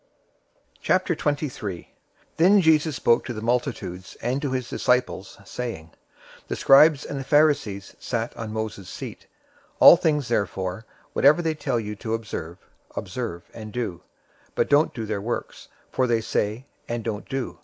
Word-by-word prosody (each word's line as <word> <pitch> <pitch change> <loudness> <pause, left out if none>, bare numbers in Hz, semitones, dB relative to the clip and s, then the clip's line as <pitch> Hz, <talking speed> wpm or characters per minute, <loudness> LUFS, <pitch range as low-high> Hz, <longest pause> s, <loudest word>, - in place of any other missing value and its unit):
023:001 145 - -1 0.5
Then 190 +5 +6
Jesus 160 -3 +3
spoke 120 -1 +3
to 120 - -5
the 110 - -6
multitudes 115 -7 -2
and 125 +4 -1
to 145 - -1
his 130 -2 -2
disciples, 125 -6 0
023:002 100 - -20
saying, 100 -11 -5 0.6
"The - - -2
scribes 145 +1 +6
and 140 - -4
the - - -4
Pharisees 140 -10 +2
sat 115 -1 -3
on 110 -1 -6
Moses' 110 -3 -5
seat. - - -8 0.5
023:003 - - -38
All - - +11
things 150 -6 +1
therefore 100 -2 -2 0.3
whatever 150 +5 +5
they 160 -1 +1
tell 145 -5 -1
you 105 -1 -5
to 110 +1 -2
observe, 90 -7 -6 0.4
observe 95 -3 -4
and 110 -2 -8
do, 110 -7 -4 0.5
but - - +2
don't 145 +2 +5
do 115 -2 -5
their 105 -2 -3
works; 120 +4 -5 0.2
for 130 - +1
they 115 -2 +2
say, 110 +3 -2 0.2
and 120 -1 -2
don't 105 -2 -4
do. 135 -2 -4
120 Hz, 155 wpm, -24 LUFS, 105-145 Hz, 0.6 s, All